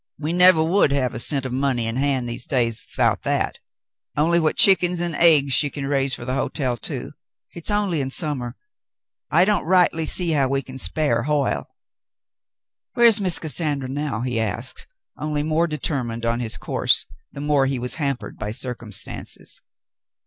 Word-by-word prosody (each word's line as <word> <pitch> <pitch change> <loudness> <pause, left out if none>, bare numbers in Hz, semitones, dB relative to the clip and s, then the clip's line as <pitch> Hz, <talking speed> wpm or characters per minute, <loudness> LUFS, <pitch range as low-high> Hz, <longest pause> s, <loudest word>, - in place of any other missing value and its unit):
We 155 +3 -3
nevah 180 -2 +6
would 165 -2 +2
have 130 -3 0
a - - -5
cent 135 +1 +2
o' - - -3
money 130 -2 0
in 115 +1 -2
hand 135 -2 0
these 120 +1 -1
days 115 -4 0
'thout - - 0
that, - - -2 0.6
only 170 +3 +3
what 160 -2 0
chick'ns 180 -3 +4
'nd 175 -1 -2
aigs 150 -4 +4
she 145 +3 +3
can 140 -1 -6
raise 135 -1 0
fer 120 - -9
the 130 - -3
hotel, 130 -2 -1
too. 115 - -6 0.4
Hit's 170 - -5
only 205 -7 0
in 135 - -3
summah. 135 -5 -1 0.7
I 175 - +4
don't 210 -2 +1
rightly 170 -2 +2
see 175 -3 +2
how 140 -4 +1
we 135 0 -1
can 130 +1 -10
spare 155 +2 0
Hoyle." 150 -2 -1 1.3
"\Miere's 235 -3 +6
Miss 185 -4 +5
Cassandra 150 -4 -1
now?" 140 -3 -3
he 125 -2 -2
asked, 115 +4 -4 0.3
onlv 150 -1 -2
more 160 +2 +1
determined 125 -7 -3
on 115 +1 0
his 115 -2 -3
course - - +1 0.3
the - - -10
more 145 -2 +1
he 135 -1 -1
was 125 +1 -1
hampered 140 -3 -3
by 105 - -4
circumstances. 115 -2 -5
140 Hz, 170 wpm, -22 LUFS, 125-160 Hz, 1.3 s, nevah